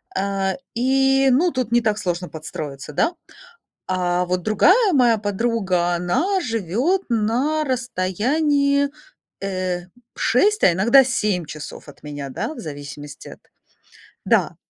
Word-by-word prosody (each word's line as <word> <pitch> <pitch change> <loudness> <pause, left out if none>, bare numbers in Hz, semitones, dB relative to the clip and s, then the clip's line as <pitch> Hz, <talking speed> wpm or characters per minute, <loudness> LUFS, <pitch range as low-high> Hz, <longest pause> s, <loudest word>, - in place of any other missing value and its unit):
А, 195 0 -1 0.2
и 270 +2 +3
ну 340 +8 +3
тут 255 -4 -2
не 240 0 +4
так 215 -2 0
сложно 180 -3 -3
подстроиться, 150 -2 -7
да? 335 - +1 0.7
А 180 -1 0
вот 180 0 -2
другая 370 - +4
моя 240 -4 +4
подруга, 200 -4 0
она 245 - 0
живёт 230 - 0
на 245 +8 +1
расстоянии 280 - +1 0.5
э, 185 -2 -3 0.3
6, 415 - +2
а 180 - +7
иногда 235 +10 +5
7 210 -8 -1
часов 150 0 -9
от 145 - -16
меня, 145 -2 -6
да, 200 - -4
в - - -11
зависимости 145 -1 -9
от - - -12 0.9
Да. - - +2
210 Hz, 125 wpm, -21 LUFS, 175-270 Hz, 0.9 s, а